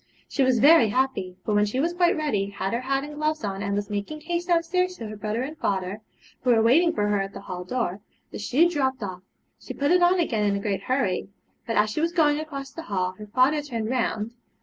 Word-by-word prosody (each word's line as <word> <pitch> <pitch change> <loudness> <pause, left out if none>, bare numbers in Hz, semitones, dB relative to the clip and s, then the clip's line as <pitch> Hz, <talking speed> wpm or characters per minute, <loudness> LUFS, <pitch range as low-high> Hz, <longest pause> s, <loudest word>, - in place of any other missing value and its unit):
She - - -2
was 260 -2 +4
very 280 -2 +6
happy; 205 -6 -1
but 215 - 0
when 210 0 +3
she 255 +6 -2
was 335 +5 +1
quite 350 -1 +2
ready, 215 -11 0
had 195 0 -3
her 235 - -1
hat 270 +1 0
and 295 +1 -7
gloves 305 -1 -1
on, 195 -1 -3
and 200 -1 -1
was 205 0 -2
making 205 +10 -4
haste 345 +2 -3
downstairs 360 +1 +1
to 230 - -6
her 215 0 -6
brother 215 +3 -2
and 295 +4 -6
father, 195 - -2 0.4
who 250 - 0
were 230 -2 +5
waiting 325 +9 +5
for 210 -11 0
her 205 -1 +2
at 195 0 -5
the - - -8
hall 180 -2 -6
door, 200 -2 -2 0.3
the - - -7
shoe 260 +11 +3
dropped 265 -7 -1
off. 185 -2 -5 0.4
She - - -8
put 285 +2 +1
it 360 0 +5
on 355 +1 +4
again 230 -11 +1
in 200 -1 +2
a - - -1
great 200 -2 -2
hurry, 200 -6 -1 0.4
but 230 - -1
as 210 0 +3
she 305 - -2
was 335 +1 0
going 300 -4 +3
across 280 -3 -6
the 330 - -7
hall 185 -2 0
her 210 - -8
father 260 +7 +3
turned 235 -6 -4
round. 230 -3 -1
250 Hz, 245 wpm, -25 LUFS, 205-305 Hz, 0.4 s, very